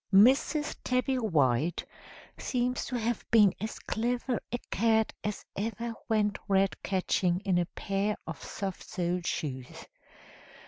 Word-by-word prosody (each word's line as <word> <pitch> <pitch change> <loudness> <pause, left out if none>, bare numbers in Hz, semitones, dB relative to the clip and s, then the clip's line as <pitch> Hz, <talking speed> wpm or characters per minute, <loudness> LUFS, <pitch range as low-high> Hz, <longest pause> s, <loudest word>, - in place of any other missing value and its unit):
"Mrs. 265 +8 +5
Tabby 255 +1 +1
White 155 - +2 0.5
seems 250 0 -1
to 255 - -4
have 235 0 -1
been 210 -4 +6
as 220 - -3
clever 240 +2 -1
a 240 - 0
cat 220 +1 +3
as 210 -1 -3
ever 230 +3 -3 0.2
went 210 -2 +2
rat 195 -1 +3
catching 185 -2 +1
in 190 -4 +2
a 175 - 0
pair 200 +2 -1
of - - -7
soft 195 -2 -5
soled 175 -1 -1
shoes. 130 -5 -4
210 Hz, 130 wpm, -30 LUFS, 185-235 Hz, 0.5 s, been